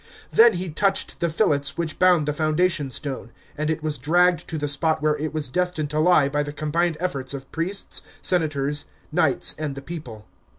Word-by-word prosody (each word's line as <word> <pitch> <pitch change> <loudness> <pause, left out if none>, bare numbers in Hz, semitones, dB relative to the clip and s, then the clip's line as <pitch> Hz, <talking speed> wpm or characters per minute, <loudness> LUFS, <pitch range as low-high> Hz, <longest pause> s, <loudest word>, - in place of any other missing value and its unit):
Then 235 +1 +7
he 180 0 -4
touched 195 +5 0
the 170 - +1
fillets 145 -5 +1
which 170 -2 -3
bound 180 -4 +5
the 150 - +1
foundation 155 0 +1
stone, 130 -3 -5 0.2
and 155 +1 -2
it 160 -1 -2
was 155 -2 -2
dragged 175 +1 +2
to 160 - -3
the 145 -1 -2
spot 155 +3 +1
where 150 0 +2
it 150 +1 -3
was 155 -2 -2
destined 165 0 -1
to 155 - 0
lie 155 -3 +5
by 145 +1 0
the 145 0 -4
combined 155 +3 -1
efforts 140 -7 -2
of 135 -1 -9
priests, 180 +5 -3 0.2
senators, 145 -4 0 0.3
knights, - - +2
and 150 -3 -3
the 140 - -7
people. 130 -10 -8
155 Hz, 195 wpm, -23 LUFS, 145-175 Hz, 0.3 s, Then